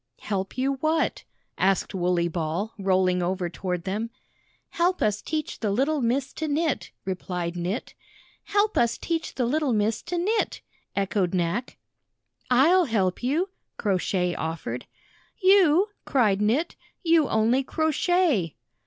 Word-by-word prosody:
"Help 195 Hz, 0 st, -3 dB
you 270 Hz, +1 st, 0 dB
what?" 315 Hz, +3 st, 0 dB, 0.3 s
asked 195 Hz, +1 st, +2 dB
Wooley 175 Hz, -2 st, +1 dB
Ball, 170 Hz, +5 st, -2 dB
rolling 185 Hz, -2 st, +2 dB
over 180 Hz, -1 st, -1 dB
toward 180 Hz, -2 st, -3 dB
them. 210 Hz, +4 st, -2 dB, 0.6 s
"Help 360 Hz, +2 st, +1 dB
us 210 Hz, -1 st, +1 dB
teach 310 Hz, -2 st, -3 dB
the 220 Hz, -, -1 dB
httle 270 Hz, +9 st, +1 dB
Miss 260 Hz, +4 st, 0 dB
to 315 Hz, -, -3 dB
knit," 290 Hz, -, 0 dB, 0.2 s
replied 180 Hz, -2 st, -3 dB
Knit. 180 Hz, +6 st, -3 dB, 0.5 s
"Help 410 Hz, +1 st, +2 dB
us 235 Hz, -1 st, +2 dB
teach 330 Hz, -1 st, -3 dB
the 250 Hz, -, 0 dB
little 285 Hz, +1 st, +1 dB
Miss 215 Hz, +1 st, +1 dB
to 355 Hz, -, -4 dB
knit," 420 Hz, +6 st, 0 dB, 0.3 s
echoed 195 Hz, -2 st, 0 dB
Knack. 175 Hz, +8 st, -1 dB, 0.7 s
"I'll 325 Hz, +9 st, +5 dB
help 195 Hz, -, 0 dB
you!" 305 Hz, +10 st, 0 dB, 0.3 s
Crow 195 Hz, -4 st, +1 dB
Shay 180 Hz, -1 st, 0 dB
offered. 160 Hz, -8 st, -4 dB, 0.5 s
"You?" 380 Hz, -1 st, +5 dB
cried 210 Hz, -7 st, +2 dB
Knit. 250 Hz, +11 st, +1 dB, 0.3 s
"You 330 Hz, -4 st, +4 dB
only 230 Hz, +5 st, +2 dB
crochet!" 315 Hz, -, +1 dB
225 Hz, 135 wpm, -26 LUFS, 185-310 Hz, 0.7 s, I'll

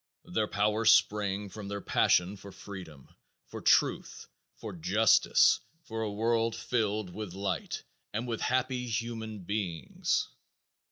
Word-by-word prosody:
Their 105 Hz, +4 st, -1 dB
power 105 Hz, +2 st, +1 dB
sprang 105 Hz, -2 st, +3 dB
from 100 Hz, +1 st, -8 dB
their 100 Hz, 0 st, -4 dB
passion 95 Hz, 0 st, +2 dB
for 100 Hz, 0 st, -11 dB
freedom, 90 Hz, -8 st, -10 dB, 0.4 s
for -, -, -8 dB
truth, -, -, +2 dB, 0.3 s
for 110 Hz, -3 st, -7 dB
justice, 100 Hz, +6 st, +4 dB, 0.2 s
for 110 Hz, 0 st, -5 dB
a 110 Hz, -2 st, -2 dB
world 115 Hz, +2 st, +1 dB
filled 110 Hz, -5 st, -1 dB
with 105 Hz, -3 st, -6 dB
light 95 Hz, -1 st, -3 dB, 0.3 s
and 115 Hz, +4 st, -3 dB
with 115 Hz, -2 st, -3 dB
happy 130 Hz, 0 st, 0 dB
human 110 Hz, -3 st, -4 dB
beings. 95 Hz, -4 st, -1 dB
105 Hz, 125 wpm, -30 LUFS, 100-115 Hz, 0.4 s, justice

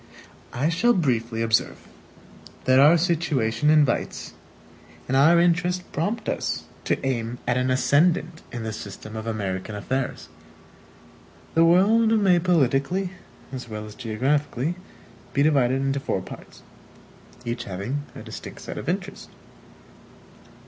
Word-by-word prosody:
I 140 Hz, +6 st, 0 dB
shall 180 Hz, +9 st, +3 dB
briefly 115 Hz, -, 0 dB
observe, 115 Hz, 0 st, +1 dB, 0.9 s
that 130 Hz, 0 st, +5 dB
our 150 Hz, +5 st, +7 dB
situation 150 Hz, -7 st, +1 dB
invites 150 Hz, -5 st, +1 dB, 0.7 s
and 135 Hz, -, 0 dB
our 160 Hz, +6 st, +6 dB
interests 175 Hz, +1 st, +2 dB
prompt 205 Hz, +10 st, -2 dB
us -, -, -2 dB, 0.2 s
to -, -, +1 dB
aim 120 Hz, -2 st, -2 dB
at 120 Hz, -, +2 dB
an 125 Hz, 0 st, +1 dB
ascendant 160 Hz, +6 st, +2 dB
in 120 Hz, -2 st, -5 dB
the 110 Hz, -1 st, -4 dB
system 110 Hz, +1 st, -8 dB
of 110 Hz, +1 st, -5 dB
American 100 Hz, -2 st, -3 dB
affairs. 125 Hz, -5 st, -3 dB, 1.3 s
The 165 Hz, 0 st, +5 dB
world 205 Hz, +7 st, +5 dB
may 185 Hz, -4 st, +4 dB
politically, 170 Hz, +2 st, +1 dB, 0.4 s
as 125 Hz, -2 st, -6 dB
well 105 Hz, -1 st, -6 dB
as 105 Hz, -, -10 dB
geographically, 130 Hz, +6 st, -1 dB, 0.6 s
be 140 Hz, -, +3 dB
divided 135 Hz, -4 st, +3 dB
into 135 Hz, 0 st, 0 dB
four 95 Hz, -7 st, -2 dB
parts, -, -, -12 dB, 0.8 s
each 120 Hz, 0 st, -3 dB
having 100 Hz, +10 st, -3 dB
a -, -, -8 dB
distinct -, -, -9 dB
set -, -, -6 dB
of -, -, -5 dB
interests. -, -, -4 dB
135 Hz, 130 wpm, -24 LUFS, 115-170 Hz, 1.3 s, our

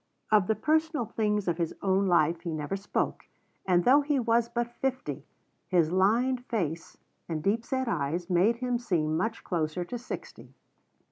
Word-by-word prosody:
Of 210 Hz, -4 st, +4 dB
the 220 Hz, -, +2 dB
personal 315 Hz, -3 st, +1 dB
things 210 Hz, -2 st, -1 dB
of 170 Hz, 0 st, 0 dB
his 165 Hz, -2 st, -1 dB
own 195 Hz, 0 st, +2 dB
life 170 Hz, -1 st, +3 dB
he 170 Hz, -, -5 dB
never 155 Hz, +4 st, -3 dB
spoke, 200 Hz, +1 st, -2 dB, 0.4 s
and 175 Hz, -1 st, +4 dB
though 275 Hz, +4 st, +6 dB
he 290 Hz, -1 st, 0 dB
was 235 Hz, -1 st, +2 dB
but 240 Hz, 0 st, -2 dB
fifty, 265 Hz, -1 st, -3 dB, 0.4 s
his 170 Hz, -4 st, +2 dB
lined 235 Hz, +7 st, +2 dB
face 170 Hz, -8 st, -3 dB, 0.3 s
and 155 Hz, -2 st, -3 dB
deep 215 Hz, +5 st, +1 dB
set 260 Hz, +1 st, -2 dB
eyes 170 Hz, -3 st, -1 dB
made 185 Hz, +6 st, +3 dB
him 245 Hz, 0 st, -1 dB
seem 160 Hz, -9 st, 0 dB
much 225 Hz, +7 st, -2 dB
closer 170 Hz, 0 st, -2 dB
to 245 Hz, +7 st, -5 dB
sixty. 245 Hz, -, -9 dB
205 Hz, 165 wpm, -28 LUFS, 175-240 Hz, 0.4 s, though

